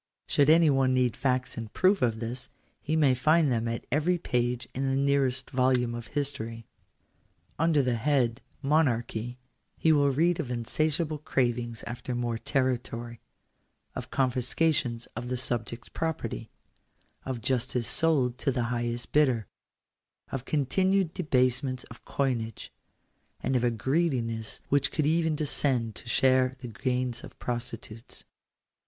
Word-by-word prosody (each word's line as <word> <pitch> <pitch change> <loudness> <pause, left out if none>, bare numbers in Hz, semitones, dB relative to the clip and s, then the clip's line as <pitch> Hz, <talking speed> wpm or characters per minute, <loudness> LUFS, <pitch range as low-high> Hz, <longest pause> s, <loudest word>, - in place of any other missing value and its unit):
Should 145 0 +3
any 160 -1 +6
one 135 -1 +3
need 125 -2 +2
facts 130 -3 -1
in 115 - -5
proof 185 - +2
of 115 -3 +1
this, 120 +2 -5 0.4
be 155 - +1
may 145 -5 +4
find 155 +3 +3
them 115 -1 0
at 115 0 -3
every 155 +6 +2
page 125 -5 -1
in 135 +1 -1
the 135 - +1
nearest 135 -2 +1
volume 125 -2 +2
of 120 0 -6
history. 135 -6 -3 0.9
Under 160 -3 +3
the 125 -2 +1
head 125 -2 +1
— - - -37
Monarchy, 120 -5 +1 0.4
he 160 - +3
will 145 -2 +4
read 165 +6 +2
of 145 -7 -3
insatiable 150 +6 0
cravings 120 -5 -1
after 120 +1 -5
more 120 -1 -1
territory; 120 -3 -2 0.7
of - - -6
confiscations 130 -1 +1
of 120 - -5
the 125 - -1
subjects' 120 -1 -3
property; 160 -9 -3 0.7
of 130 -3 -3
justice 125 0 0
sold 135 -7 +2
to 140 - +1
the 125 -1 0
highest 120 0 -3
bidder; 130 -8 +3 0.9
of 135 -1 -4
continued 185 +5 +1
debasements 130 -4 +1
of 115 - -12
coinage; 115 -6 -2 0.7
and 130 - -1
of 125 - +2
a 120 - +4
greediness 120 -3 -1
which 140 0 +2
could 155 - 0
even 160 0 +2
descend 135 -6 0
to 110 +6 -10
share 130 +1 +3
the 125 -1 -8
gains 125 +1 -2
of - - -11
prostitutes. 115 -2 -5
130 Hz, 140 wpm, -28 LUFS, 120-145 Hz, 0.9 s, any